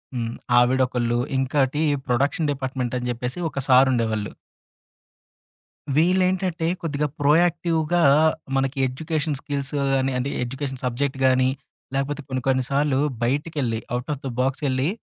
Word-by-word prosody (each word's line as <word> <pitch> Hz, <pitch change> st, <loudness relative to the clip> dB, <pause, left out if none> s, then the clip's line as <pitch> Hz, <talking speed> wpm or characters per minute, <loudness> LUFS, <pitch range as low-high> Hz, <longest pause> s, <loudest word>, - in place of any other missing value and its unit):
హ్మ్. 115 Hz, -1 st, -3 dB, 0.2 s
ఆవిడొకళ్ళు, 125 Hz, -1 st, +2 dB, 0.2 s
ఇంకోటి 135 Hz, +2 st, +1 dB, 0.3 s
ప్రొడక్షన్ 140 Hz, +5 st, +1 dB
డిపార్ట్మెంటని 130 Hz, -2 st, -3 dB
చెప్పేసి 125 Hz, +5 st, -4 dB
ఒక 140 Hz, -, -5 dB
సారుండేవాళ్ళు. 120 Hz, -5 st, +3 dB, 1.6 s
వీళ్ళేంటంటే 180 Hz, 0 st, +2 dB
కొద్దిగా 150 Hz, -2 st, -1 dB
ప్రొయాక్టివ్‌గా 165 Hz, +2 st, +2 dB, 0.5 s
మనకి 135 Hz, +1 st, 0 dB
ఎడ్యుకేషన్ 155 Hz, +2 st, -2 dB
స్కిల్స్ 140 Hz, -1 st, -4 dB, 0.2 s
గాని 135 Hz, 0 st, +1 dB
అంటే, 125 Hz, +2 st, -1 dB
ఎడ్యుకేషన్ 135 Hz, +1 st, -5 dB
సబ్జెక్ట్ 130 Hz, +2 st, -1 dB
గాని, 130 Hz, 0 st, +4 dB, 0.5 s
లేకపోతే 145 Hz, +2 st, -1 dB
కొన్ని 130 Hz, -1 st, -2 dB
కొన్ని 130 Hz, -1 st, +2 dB
సార్లు 140 Hz, -1 st, +2 dB, 0.2 s
బయటికెళ్ళి, 135 Hz, -2 st, -1 dB, 0.2 s
ఔట్ 125 Hz, +3 st, -7 dB
ఆఫ్ 140 Hz, -, -8 dB
ది 135 Hz, -, -2 dB
బాక్సెళ్ళి. 135 Hz, +1 st, 0 dB
135 Hz, 110 wpm, -23 LUFS, 125-150 Hz, 1.6 s, గాని